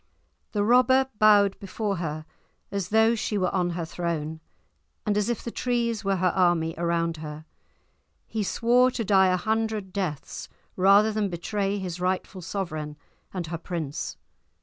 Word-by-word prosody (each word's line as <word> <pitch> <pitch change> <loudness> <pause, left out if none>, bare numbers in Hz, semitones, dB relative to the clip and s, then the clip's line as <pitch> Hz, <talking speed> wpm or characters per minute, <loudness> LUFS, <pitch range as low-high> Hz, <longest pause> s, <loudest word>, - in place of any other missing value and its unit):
The 205 -2 +1
robber 260 +3 +4
bowed 205 -2 +5
before 200 0 -3
her 155 -2 -4 0.5
as 200 -2 -2
though 220 +1 +4
she 215 -2 -1
were 185 -2 0
on 180 -2 +1
her 170 -1 -3
throne, 160 -2 -3 0.7
and 210 -2 +1
as 210 +2 +1
if 240 - -2
the 235 - -4
trees 235 -3 -1
were 195 0 +1
her 185 0 +1
army 175 -3 +2
around 170 0 0
her. 155 0 -8 0.8
He 220 - -3
swore 240 +5 +3
to 240 -3 -3
die 190 -1 +5
a 185 0 +2
hundred 220 -1 -1
deaths 180 -8 -4 0.3
rather 200 +3 +5
than 210 -2 0
betray 195 +3 -2
his 180 -2 -5
rightful 185 +1 -2
sovereign 155 -5 -4 0.3
and 180 -3 -4
her 165 +1 -5
prince. 160 -5 -4
190 Hz, 155 wpm, -26 LUFS, 170-215 Hz, 0.8 s, bowed